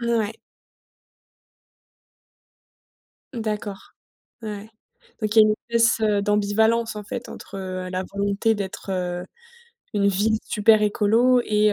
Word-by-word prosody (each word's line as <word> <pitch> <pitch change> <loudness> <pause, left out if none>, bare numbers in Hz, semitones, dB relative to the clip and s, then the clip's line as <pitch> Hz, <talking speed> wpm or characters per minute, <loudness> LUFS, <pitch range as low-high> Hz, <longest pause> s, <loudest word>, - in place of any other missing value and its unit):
Mouais. 230 -3 0 3.0
D'accord, 210 -4 -5 0.5
ouais. 210 -1 -6 0.5
Donc, 215 0 -2
il - - +10
y - - +6
a - - +3
une 215 - +3 0.2
espèce, 230 0 +3
heu, 210 -2 +2
d'ambivalence, 220 +2 +1
en 210 - -5
fait, 240 +3 -6
entre, 195 - -9
heu, 185 -1 -5
la 185 0 -2
volonté 200 +2 +1
d'être, 195 -1 -6
heu, 180 -1 -2 0.7
une 200 -1 +3
ville 210 +3 +1
super 215 0 +4
écolo 225 +4 +3
et 210 0 +3
210 Hz, 125 wpm, -23 LUFS, 200-220 Hz, 3.0 s, il